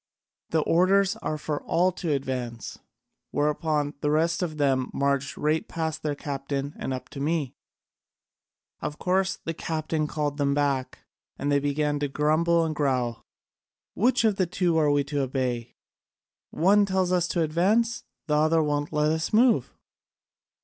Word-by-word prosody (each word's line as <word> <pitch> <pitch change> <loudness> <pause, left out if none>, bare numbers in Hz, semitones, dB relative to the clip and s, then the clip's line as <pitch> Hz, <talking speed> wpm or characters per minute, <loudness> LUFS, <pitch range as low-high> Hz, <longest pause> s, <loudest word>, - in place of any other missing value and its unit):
The 160 - +2
orders 190 +4 +3
are 155 - -3
for 150 -1 -3
all 180 +3 +2
to 170 -2 -3
advance!' 130 -4 -3 0.5
Whereupon 150 0 0
the 150 - +1
rest 165 +3 +1
of 160 -4 -3
them 135 -3 +1
marched 140 0 0
right 155 +2 0
past 160 -1 -3
their 150 -1 -2
captain 140 0 -4
and - - -3
up 130 -1 -4
to 140 - -8
me. 150 -2 -1 1.3
Of 150 - -4
course 190 +1 +1
the 165 - -2
captain 155 -1 -2
called 150 -2 -2
them 140 0 +2
back, 140 -3 -1 0.3
and 145 - -1
they 140 - +4
began 145 +1 0
to 145 - 0
grumble 160 +4 +2
and 155 -1 -3
growl: 125 -5 0 0.7
'Which 245 +3 +2
of 215 -3 +2
the 185 - +1
two 175 -1 0
are 150 -2 +3
we 145 0 +3
to 140 0 -2
obey? 125 -3 -2 0.7
One 200 +5 +3
tells 190 -1 +1
us 175 -1 +2
to 170 -2 0
advance, 210 +10 +1 0.2
the 150 - -1
other 155 +1 +3
won't 145 -1 -1
let 150 0 +2
us 160 +1 -1
move.' 235 +2 +3
150 Hz, 155 wpm, -26 LUFS, 140-170 Hz, 1.3 s, they